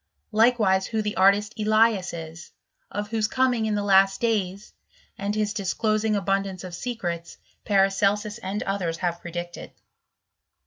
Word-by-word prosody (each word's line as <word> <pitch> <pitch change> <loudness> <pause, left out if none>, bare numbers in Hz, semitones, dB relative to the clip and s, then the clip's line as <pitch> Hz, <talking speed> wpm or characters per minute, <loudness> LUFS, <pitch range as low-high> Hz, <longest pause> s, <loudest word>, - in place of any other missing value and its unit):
Likewise 215 -4 +3
who 220 -1 -1
the 210 0 -3
artist 200 +3 +3
Elias 215 -3 +3
is, 165 0 -8 0.4
of 205 +1 -4
whose 220 -2 +1
coming 250 -2 +1
in 215 - 0
the 205 - -1
last 195 -1 +4
days, 205 -4 -1 0.4
and 200 +1 -3
his 210 -1 0
disclosing 215 +1 0
abundance 195 -1 -1
of 180 -1 -8
secrets, 175 -5 -4 0.3
Paracelsus 205 +2 +2
and 205 0 -3
others 180 -4 -2
have 170 -1 -2
predicted. 175 0 -7
200 Hz, 135 wpm, -25 LUFS, 190-215 Hz, 0.4 s, last